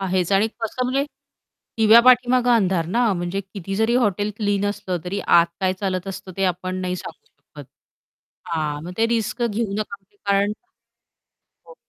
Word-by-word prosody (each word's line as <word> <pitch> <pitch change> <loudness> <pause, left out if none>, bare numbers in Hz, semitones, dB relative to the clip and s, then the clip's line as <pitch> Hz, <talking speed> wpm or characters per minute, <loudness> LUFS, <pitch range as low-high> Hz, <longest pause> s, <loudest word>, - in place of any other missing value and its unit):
आहेच 185 -1 0
आणि 195 +3 +4
कसं 230 +3 -2
म्हणजे 265 +3 0 0.7
दिव्या 220 +1 +7
पाठीमागे 250 0 +4
अंधार 190 -8 +2
ना, 230 +5 +2
म्हणजे 175 +1 -2
किती 195 -1 -7
जरी 220 +3 +2
हॉटेल 210 -4 +1
क्लीन 205 -2 0
असलं 190 -3 -3
तरी 195 +3 -3
आत 170 0 +6
काय 185 -1 +2
चालत 185 -2 -2
असतं, 195 0 -7
ते 195 - 0
आपण 185 0 -2
नाही 180 0 -2
सांगू. 445 - -10
शकत. - - -15 0.8
हां, 150 -3 -2
मग 180 - -6
ते 225 - +3
रिस्क 230 +1 -1
घेऊ 225 -2 -1
नका 200 -1 -5 0.2
कारण 200 +1 +2 1.1
हो. 485 - -14
200 Hz, 160 wpm, -22 LUFS, 185-225 Hz, 1.1 s, दिव्या